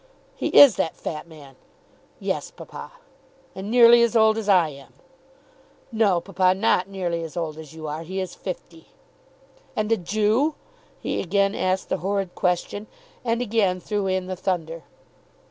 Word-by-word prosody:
"He - - -2
is 270 -10 +8
that 160 - -1
fat 155 +1 -6
man?" 145 -5 -14 0.6
"Yes, - - -3
papa." - - -11 0.6
"And 190 +2 -7
nearly 235 0 +7
as 235 0 +2
old 220 -1 +5
as 220 -2 -3
I 180 -5 +5
am?" 140 -2 -13 1.0
"No, 215 -6 +2
papa, 185 0 +1
not 190 -2 +2
nearly 175 -4 -3
as 165 0 -7
old 160 -3 -3
as 160 0 -11
you 160 -1 -8
are. 155 +1 -4
He 185 +4 -5
is 185 -2 -4
fifty." 170 -3 -8 0.9
"And 215 +1 -1
a 225 - +4
Jew?" 215 - +1 0.4
He - - -2
again 200 +2 +1
asked 185 -1 -1
the - - 0
horrid 195 -1 -2
question, 185 +3 -1 0.4
and 235 0 0
again 205 -5 +1
threw 205 +1 -2
in 185 -1 -1
the 185 0 -4
thunder. 165 -3 -3
190 Hz, 160 wpm, -24 LUFS, 170-215 Hz, 1.0 s, is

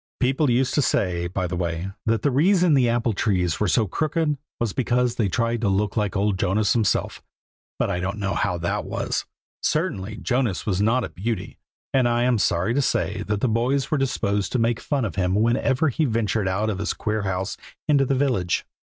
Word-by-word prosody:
People 135 +3 +2
used 125 +2 +2
to 145 - +3
say, 90 -8 0
by 90 +1 -2
the 90 0 -3
way, 85 +1 -3 0.2
that 115 -1 +1
the 145 - +2
reason 175 +4 +4
these 130 -3 +4
apple 120 0 +1
trees 90 -5 0
were 105 - +1
so 110 +4 +3
crooked, 155 - 0 0.2
was 115 -4 -1
because 125 -1 +1
they 110 -4 0
tried 115 +1 0
to 105 - +1
look 100 +1 0
like 105 -2 0
old 100 -1 +1
Jonas 100 +3 +2
himself; 110 -4 0 0.6
but - - 0
I 90 - -1
don't 95 +3 -3
know 100 -2 -1
how 90 - 0
that 85 +1 -2
was. - - -2 0.4
Certainly, 110 - -1
Jonas 125 -6 0
was 100 -2 0
not 115 +4 +2
a - - -4
beauty, 110 +5 -4 0.3
and 130 -3 +3
I 120 0 +1
am 125 -2 +2
sorry 95 +4 +1
to 140 - +2
say 105 -5 0
the 105 0 -1
boys 125 +6 0
were 155 - +2
disposed 105 -6 0
to - - +2
make 115 0 +1
fun 140 -5 -1
of 105 - -5
him 90 0 +1
whenever 125 +7 +2
he 155 +4 0
ventured 110 -4 0
out 105 +4 0
of 95 - -4
his 100 - -1
queer 110 0 -2
house 95 -1 -2 0.3
into 145 -2 +4
the 135 0 +1
village. 125 -10 0
110 Hz, 205 wpm, -23 LUFS, 95-130 Hz, 0.6 s, reason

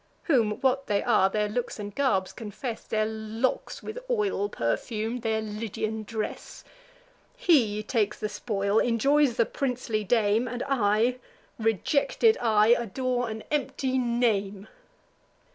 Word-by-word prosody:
(Whom, 235 -10 +2
what 270 +1 +1
they 205 -1 +1
are, 190 - +4
their 210 +1 0
looks 235 +4 -3
and 205 -1 -6
garb 200 -9 +1
confess, 225 +2 -6
Their 215 -1 0
locks 220 +3 -3
with 440 +3 -6
oil 405 - 0
perfum'd, 220 - -2
their 220 -1 0
Lydian 215 0 -4
dress.) 220 -1 -5 0.7
He 220 - +3
takes 215 -2 0
the 215 - -1
spoil, 205 -1 0
enjoys 260 +2 +2
the 230 - +4
princely 250 -5 -2
dame; 220 +2 +2
And 245 +1 -4
I, 235 -1 +2 0.4
rejected 300 - +2
I, 215 -2 +4
adore 245 +1 +1
an 220 0 -6
empty 265 -2 0
name." 220 -5 0
225 Hz, 125 wpm, -27 LUFS, 210-255 Hz, 0.7 s, are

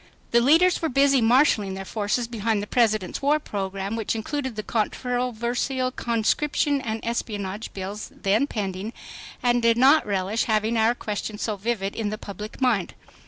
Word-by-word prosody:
The 235 - +5
leaders 330 +8 +4
were 325 - 0
busy 275 0 +4
marshaling 225 -5 +3
their 195 0 -6
forces 215 +4 -1
behind 225 -2 -1
the 205 - -3
President's 215 -4 +1
war 290 +2 +3
program, 195 -5 -4
which 225 0 -2
included 260 +2 -3
the 215 - -4
controversial 245 +3 -1
Conscription 275 +5 0
and 220 -2 -4
Espionage 210 -3 -3
Bills, 195 +2 -6
then 210 +8 +1
pending, 200 -1 -4 0.5
and 240 0 +3
did 230 0 +3
not 275 +5 +6
relish 200 +2 0
having 220 +1 +1
our 225 +2 +3
question 210 -1 -4
so 215 0 -2
vivid 200 -1 -2
in 220 -2 -2
the 215 - -4
public 210 +1 -8
mind. 235 -9 +1
225 Hz, 160 wpm, -24 LUFS, 205-250 Hz, 0.5 s, not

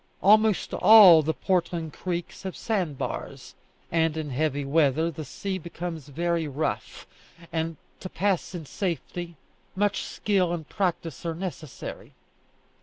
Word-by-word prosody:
Almost 215 0 +4
all 200 -7 +9
the 155 +1 0
Portland 170 -4 -1
creeks 175 -2 -4
have 190 -2 -5
sand 185 - -1
bars; - - -5 0.4
and 160 -1 +1
in 150 -3 -4
heavy 145 +1 -1
weather 155 +2 +2
the 155 0 -7
sea 190 +6 -4
becomes 170 -3 -6
very 165 +2 -1
rough, 145 +2 -3 0.5
and, 160 -1 -2 0.2
to 185 - -7
pass 195 -1 -1
in 165 -3 -6
safety, 175 0 -4 0.4
much 205 +1 +1
skill 185 -4 0
and 160 -3 -5
practice 175 -6 -2
are 165 -1 -2
necessary. 160 -5 -7
170 Hz, 130 wpm, -26 LUFS, 155-185 Hz, 0.5 s, all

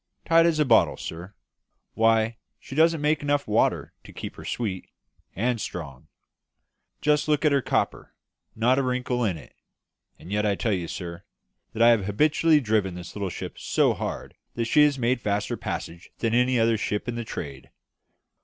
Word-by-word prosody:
"Tight 165 0 +5
as 165 -2 +1
a 150 - +3
bottle, 115 -4 +4
sir. 85 +5 -8 0.6
Why, 115 0 +2 0.2
she - - -11
don't 160 +2 +3
make 150 +1 +1
enough 145 0 0
water 105 +2 +1
to - - -13
keep - - -7
her - - -10
sweet! 100 -6 -4 0.5
And 115 +3 0
strong! 70 -7 -7 0.9
just 150 0 +2
look 150 +1 +1
at 150 - +5
her 140 -1 +3
copper - - -2 0.4
not 125 +4 +3
a - - +2
wrinkle 125 -1 -1
in 95 -7 0
it; 75 - -14 0.6
and 90 - -12
yet 105 +1 +1
I 105 -1 +1
tell 110 +1 -1
you, 90 -3 -2
sir, 85 +1 -6 0.5
that 115 - +2
I 120 - +8
have 115 -5 +3
habitually 150 +8 +3
driven 105 -7 0
this 90 -1 -9
little 100 -2 -2
ship - - -7
so - - +2
hard - - -5 0.2
that 115 - -1
she 150 +6 +4
has 145 -2 +1
made 125 0 0
faster 105 -1 -1
passages 85 +2 -6
than 115 -1 -1
any 125 +1 +3
other 115 -1 +2
ship 105 +2 -2
in 120 - -2
the 120 0 -4
trade. 70 - -7
115 Hz, 180 wpm, -25 LUFS, 100-135 Hz, 0.9 s, I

